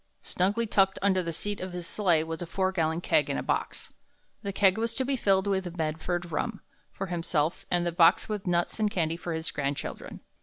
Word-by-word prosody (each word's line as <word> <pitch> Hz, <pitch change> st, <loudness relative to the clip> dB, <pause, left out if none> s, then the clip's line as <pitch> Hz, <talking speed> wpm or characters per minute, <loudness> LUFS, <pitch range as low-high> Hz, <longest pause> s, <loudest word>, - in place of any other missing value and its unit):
Snugly 205 Hz, +6 st, +1 dB
tucked 195 Hz, -3 st, +3 dB
under 190 Hz, -2 st, +3 dB
the 170 Hz, -1 st, -3 dB
seat 205 Hz, +5 st, -4 dB
of 185 Hz, -1 st, -5 dB
his 175 Hz, -1 st, -5 dB
sleigh 175 Hz, -5 st, +2 dB
was 160 Hz, +1 st, -5 dB
a 175 Hz, -, -4 dB
four 190 Hz, +2 st, 0 dB
gallon 165 Hz, -2 st, 0 dB
keg 150 Hz, -4 st, +2 dB
and 140 Hz, -, 0 dB
a -, -, -2 dB
box. -, -, -3 dB, 0.5 s
The 200 Hz, -, -3 dB
keg 195 Hz, +1 st, +3 dB
was 230 Hz, 0 st, -1 dB
to 260 Hz, -, +1 dB
be 275 Hz, +1 st, +1 dB
filled 195 Hz, -5 st, +2 dB
with 190 Hz, -3 st, -1 dB
Medford 165 Hz, +2 st, -2 dB
rum 220 Hz, -, -2 dB, 0.3 s
for 195 Hz, -, -4 dB
himself, 165 Hz, -3 st, -1 dB
and 175 Hz, -1 st, +1 dB
the 175 Hz, -, +1 dB
box 165 Hz, -1 st, +5 dB
with 210 Hz, -3 st, -4 dB
nuts 175 Hz, +4 st, 0 dB
and 215 Hz, -1 st, +2 dB
candy 165 Hz, -4 st, 0 dB
for 175 Hz, 0 st, -5 dB
his 160 Hz, +1 st, -2 dB
grandchildren. 140 Hz, -1 st, -4 dB
180 Hz, 215 wpm, -28 LUFS, 165-200 Hz, 0.5 s, box